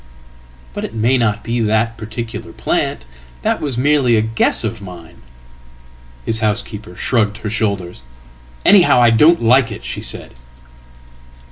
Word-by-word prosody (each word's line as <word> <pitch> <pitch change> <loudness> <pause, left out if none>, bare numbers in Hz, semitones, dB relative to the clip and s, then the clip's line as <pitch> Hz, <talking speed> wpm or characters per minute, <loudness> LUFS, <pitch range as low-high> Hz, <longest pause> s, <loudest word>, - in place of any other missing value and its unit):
""But - - -5
it 110 - -6
may 115 +4 +2
not 110 -4 0
be 120 +1 -2
that 110 +1 0
particular 110 0 -7
plant. 60 - -2 0.4
That - - 0
was 140 -5 -3
merely 135 -2 +3
a 110 - +3
guess 110 +1 0
ofmine."His 65 - -8
housekeeper 105 0 -2
shrugged 105 -4 0
her 110 -1 -5
shoulders. 100 - -2 0.6
"Anyhow 180 -10 +6
I 120 -1 +5
don't 150 +7 +4
like 120 0 +4
it," 105 - -8
shesaid. - - -4
110 Hz, 125 wpm, -17 LUFS, 90-120 Hz, 0.6 s, Anyhow